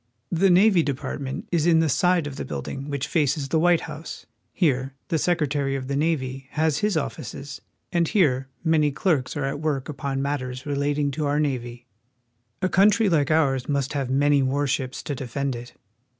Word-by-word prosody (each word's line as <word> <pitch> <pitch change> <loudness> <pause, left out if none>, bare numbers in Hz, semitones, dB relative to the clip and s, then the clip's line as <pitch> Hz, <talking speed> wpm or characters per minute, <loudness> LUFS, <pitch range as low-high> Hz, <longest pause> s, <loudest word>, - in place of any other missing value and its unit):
The 190 +3 +3
Navy 185 0 +5
Department 140 -1 -4
is 170 -2 +2
in 165 -2 +5
the 160 - +3
side 175 +3 +2
of 145 -2 -6
the - - -3
building 135 - -5
which 140 -2 -2
faces 150 -3 0
the 160 - +2
White 175 0 +4
House. 155 +1 -8 0.3
Here 135 -6 0
the 160 - +1
Secretary 145 -5 0
of 130 -1 -4
the 140 - -2
Navy 135 -4 -1
has 155 -1 +1
his 210 -5 +1
offices, 135 -1 -5 0.3
and 170 -2 +2
here 135 - +2 0.2
many 155 -2 +3
clerks 145 -3 0
are 145 - -1
at 135 +1 -3
work 150 -3 -2
upon 135 -2 -3
matters 130 -2 -3
relating 145 0 0
to 150 +2 -2
our 145 +1 +1
navy. 125 -4 -2 0.8
A - - +4
country 205 +3 +4
Hke 150 -6 +2
ours 140 -5 +2
must 140 -1 0
have 135 -3 -2
many 140 +1 +3
war 135 +2 +1
ships 130 -2 -2
to 145 - -3
defend 135 +1 -3
it. 120 +1 -9
145 Hz, 180 wpm, -24 LUFS, 135-160 Hz, 0.8 s, Navy